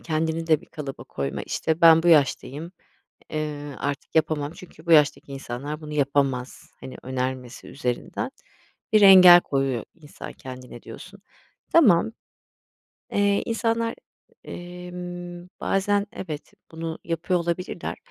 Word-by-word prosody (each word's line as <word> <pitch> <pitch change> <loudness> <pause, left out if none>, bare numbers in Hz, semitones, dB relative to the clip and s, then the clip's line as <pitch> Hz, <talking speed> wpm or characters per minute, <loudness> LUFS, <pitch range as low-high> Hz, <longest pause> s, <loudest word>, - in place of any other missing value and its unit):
kendini 160 0 -2
de 155 -2 +3
bir - - -18
kalıba 145 -4 -8
koyma, 70 0 -4
işte, 160 +1 -2
ben 165 -1 +7
bu 175 - +2
yaştayım, 155 +1 +2 0.6
eee, 150 -2 -4
artık 140 +3 -4
yapamam 155 -2 +1
çünkü 175 -2 -15
bu 170 - +3
yaştaki 150 -2 +4
insanlar 135 +3 -6
bunu 150 -1 -8
yapamaz. 135 -3 -1
Hani, 130 - -9
önermesi 130 -1 -4
üzerinden 125 -3 -3 0.6
bir 215 - +6
engel 185 -3 +10
koyuyor 135 -6 -1
insan 155 -4 -11
kendine 125 -2 -10
diyorsun. 185 - -11 0.5
Tamam. 220 - +5 1.0
Eee, 200 0 +2
insanlar, 230 0 -1 0.5
emm, 175 0 -8
bazen 200 +1 +1
evet, 155 -5 -7 0.2
bunu 160 0 -5
yapıyor 170 +2 -1
olabilirler. 170 +1 -4
160 Hz, 120 wpm, -24 LUFS, 140-175 Hz, 1.0 s, engel